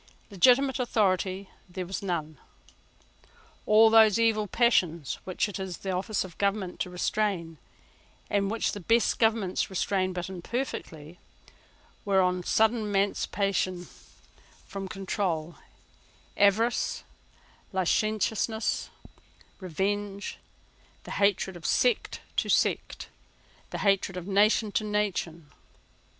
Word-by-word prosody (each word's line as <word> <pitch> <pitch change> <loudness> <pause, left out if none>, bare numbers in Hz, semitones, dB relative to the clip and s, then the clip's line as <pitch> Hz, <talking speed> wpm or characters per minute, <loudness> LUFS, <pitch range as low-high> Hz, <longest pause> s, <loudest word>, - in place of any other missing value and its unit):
Legitimate 255 +8 +4
authority 195 -5 0 0.2
there 180 0 -5
was 190 +2 -5
none. 160 -6 -3 1.3
All 220 +1 +6
those 225 -1 +6
evil 220 -2 +2
passions 180 - +1
which 185 +2 -1
it 205 - -6
is 190 -2 -5
the 195 - -4
office 190 +3 -1
of 180 -3 -12
government 200 -2 -1
to - - -2
restrain, 180 -3 -2 0.7
and 200 -1 0
which 225 +1 0
the 205 - -6
best 225 +4 +2
governments 220 -5 +1
restrain 190 0 0
but 180 -1 -4
imperfectly, 175 - -5 0.8
were 195 -2 +2
on 180 -1 +2
a - - -7
sudden 220 +5 +2
emancipated 195 -2 0 0.8
from 195 -1 -6
control; 185 -5 -3 0.8
avarice, 220 +4 +2 0.7
licentiousness, 215 +3 0 0.7
revenge, 200 +3 -3 0.6
the - - -10
hatred 200 -2 +1
of 175 - -11
sect 250 +9 +1 0.2
to - - 0
sect, - - 0 0.6
the - - -5
hatred 195 -2 +2
of 180 - -6
nation 205 +2 +3
to 215 - 0
nation. 195 -7 -2
195 Hz, 110 wpm, -28 LUFS, 180-215 Hz, 1.3 s, All